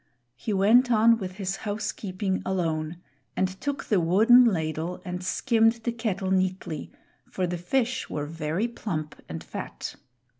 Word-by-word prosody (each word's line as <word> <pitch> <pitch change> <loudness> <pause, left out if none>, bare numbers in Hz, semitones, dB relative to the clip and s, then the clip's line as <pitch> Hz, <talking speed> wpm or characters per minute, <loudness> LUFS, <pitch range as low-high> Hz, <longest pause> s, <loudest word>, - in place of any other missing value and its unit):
He 215 - -4
went 220 +6 +5
on 230 +1 +5
with 185 -2 -5
his 190 -1 -3
housekeeping 200 -2 -3
alone 165 -3 -1 0.4
and 190 - +3
took 285 -1 -2
the 205 - +2
wooden 220 +9 +6
ladle 165 -3 -1
and 180 0 -4
skimmed 225 +3 +3
the 235 - 0
kettle 205 -5 -2
neatly, 185 -4 -1 0.4
for 185 - -1
the 175 0 -3
fish 260 +7 0
were 145 -1 -3
very 165 +7 -2
plump 160 -10 -5
and 80 0 -5
fat. - - -6
190 Hz, 145 wpm, -26 LUFS, 170-225 Hz, 0.4 s, wooden